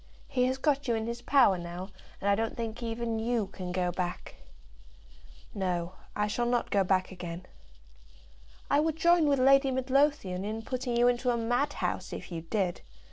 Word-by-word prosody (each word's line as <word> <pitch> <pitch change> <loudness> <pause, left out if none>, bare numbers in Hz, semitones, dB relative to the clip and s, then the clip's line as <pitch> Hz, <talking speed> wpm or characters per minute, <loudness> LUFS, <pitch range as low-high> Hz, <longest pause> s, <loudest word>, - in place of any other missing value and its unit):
He 250 -1 +1
has 260 +1 0
got 285 0 +1
you 235 - +2
in 220 0 -2
his 235 +1 -4
power 245 -11 +4
now, 175 +2 -6 0.3
and 200 - -3
I 200 - +5
don't 225 +2 -1
think 230 0 -4
even 230 -1 -2
you 230 -1 0
can 185 -2 -7
go 180 -1 0
back." 175 0 -4 1.2
"No; 180 -3 -2 0.2
I 210 - +1
shall 240 +3 -1
not 240 0 0
go 200 -1 +3
back 185 0 +1
again." 175 -1 -7 1.2
"I 285 - +3
would 315 0 +1
join 340 -1 +4
with 280 -1 +3
Lady 275 +1 +5
Midlothian 260 -7 +1
in 220 +2 -4
putting 250 0 -2
you 240 +1 +5
into 245 +1 +1
a 240 - +2
madhouse, 245 +5 -1
if - - -7
you 165 -1 -4
did. 180 +1 -1
230 Hz, 180 wpm, -29 LUFS, 190-260 Hz, 1.2 s, I